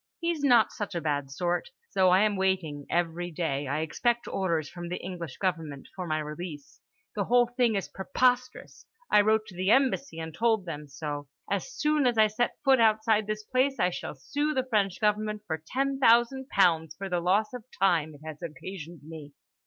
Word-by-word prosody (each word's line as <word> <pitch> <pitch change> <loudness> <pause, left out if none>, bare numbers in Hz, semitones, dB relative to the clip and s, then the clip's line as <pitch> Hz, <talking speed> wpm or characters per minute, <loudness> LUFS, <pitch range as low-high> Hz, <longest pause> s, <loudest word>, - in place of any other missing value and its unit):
He's 335 -3 -1
not 245 -6 +5
such 205 -3 -5
a - - 0
bad 145 -3 -2
sort. 175 - -2 0.2
So 185 -1 +4
I 185 +2 +5
am 210 -1 +2
waiting; 185 -7 -1
every 175 0 -1
day 145 -4 -2
I 145 +3 -1
expect 235 +9 0
orders 170 -6 -1
from 175 +1 -8
the 180 - -3
English 170 -6 -7
government 165 -7 -3
for 180 -2 -5
my 155 -1 0
release. 150 -1 -7 0.3
The 200 -2 -1
whole 245 0 +4
thing 240 -4 +3
is 195 - -2
preposterous. 250 +4 -1 0.2
I 210 - +7
wrote 215 +1 +2
to 200 -4 -13
the 185 +2 -1
Embassy 265 -4 +2
and 160 -1 -6
told 225 -2 +1
them 150 -3 -6
so. 145 0 -5 0.2
As 200 -2 -1
soon 300 -3 +2
as 240 -2 +1
I 220 - +7
set 215 +3 -1
foot 265 -2 +5
outside 220 -1 +3
this 215 0 -3
place, 260 +4 +1
I 180 0 +3
shall 170 - -6
sue 295 - -2
the 260 -1 0
French 200 -6 +1
government 210 0 0
for 160 -5 -3
ten 270 +4 -1
thousand 255 +2 +4
pounds 165 -5 +2
for 195 - -5
the 180 -2 0
loss 195 +7 +1
of 250 -3 -7 0.2
time 165 -6 +2
it 145 - -16
has 155 0 -8
occasioned 170 0 -8
me. 155 -2 -10
190 Hz, 195 wpm, -28 LUFS, 160-225 Hz, 0.3 s, I